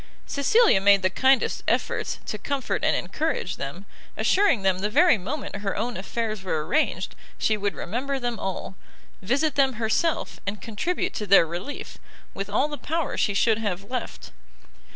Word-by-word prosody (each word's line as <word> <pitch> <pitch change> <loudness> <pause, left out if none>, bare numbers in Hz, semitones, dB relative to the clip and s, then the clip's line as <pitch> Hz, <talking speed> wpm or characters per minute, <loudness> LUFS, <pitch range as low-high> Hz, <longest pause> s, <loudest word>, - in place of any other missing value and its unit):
Cecilia 285 - +4
made 200 -1 +5
the 185 - +2
kindest 265 +4 +3
efforts, - - 0
to - - -4
comfort 280 -3 -2
and - - +3
encourage 305 - -2
them, 140 +9 -6 0.3
assuring 365 - +3
them 190 -1 +2
the 205 +2 0
very 340 +6 +5
moment 220 +5 -5
her 200 -1 -3
own 245 0 -2
affairs 215 +2 -3
were 160 -5 -2
arranged, 310 - 0 0.2
she 220 - +2
would 205 -1 -2
remember 270 +4 -3
them 240 -3 -3
all, 190 0 -4 0.5
visit 275 +9 +1
them 270 -2 +3
herself, 235 +9 0
and 205 +1 -2
contribute 345 - -2
to 210 - -4
their 195 -4 +7
relief, 175 - -6 0.3
with 195 +1 -5
all 215 +8 +2
the 295 -1 -6
power 325 -1 -2
she 200 - +1
should 225 +2 +3
have 200 0 -3
left. 255 - -5
225 Hz, 165 wpm, -25 LUFS, 195-280 Hz, 0.5 s, their